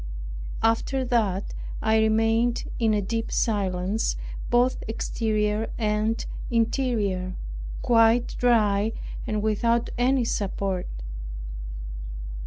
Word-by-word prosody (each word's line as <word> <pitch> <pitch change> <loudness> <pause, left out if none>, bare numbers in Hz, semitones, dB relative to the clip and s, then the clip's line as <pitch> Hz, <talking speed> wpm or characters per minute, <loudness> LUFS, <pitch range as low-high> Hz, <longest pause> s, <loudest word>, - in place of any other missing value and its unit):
After 240 +4 +2
that 210 -6 +1 0.3
I 220 0 +3
remained 225 +2 +3 0.2
in 220 -2 +3
a 205 - +1
deep 225 +3 -2
silence, 195 -1 0 0.3
both 245 +1 +3
exterior 215 -1 0
and 215 0 0 0.2
interior, 220 -6 +1 0.5
quite 230 0 +4
dry 220 -3 +3 0.3
and 215 -1 -1
without 230 +2 +2
any 255 0 +3
support. 195 -3 -1
225 Hz, 85 wpm, -26 LUFS, 210-235 Hz, 0.5 s, quite